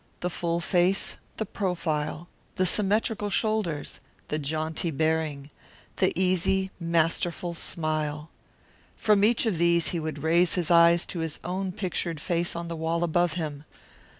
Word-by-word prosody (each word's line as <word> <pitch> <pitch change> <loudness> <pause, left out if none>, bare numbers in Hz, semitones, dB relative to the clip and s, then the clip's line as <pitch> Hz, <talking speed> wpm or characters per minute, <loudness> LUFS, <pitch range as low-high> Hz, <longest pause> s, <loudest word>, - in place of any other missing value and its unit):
The 180 - -1
full 170 0 -1
face, 180 +2 +2 0.2
the 220 - -2
profile, 170 -5 -2 0.3
the 185 - +1
symmetrical 210 +2 +1
shoulders, 205 -7 -1 0.3
the 150 - -1
jaunty 155 +3 -2
bearing, 155 -2 -1 0.5
the - - +3
easy, 190 +1 +1
masterful 170 +1 0
smile. 155 -2 -2 0.7
From 210 -2 +3
each 230 +3 +3
of 200 -8 0
these 170 -1 +3
he 170 - -2
would 155 -2 -5
raise 170 +2 +3
his 175 -2 0
eyes 170 0 +6
to 175 - -5
his 160 -2 -3
own 185 +1 -2
pictured 175 -4 -3
face 170 +1 -1
on 170 0 -4
the 170 - -4
wall 165 +1 -1
above 175 0 +1
him. 150 -4 -4
170 Hz, 145 wpm, -27 LUFS, 160-185 Hz, 0.7 s, eyes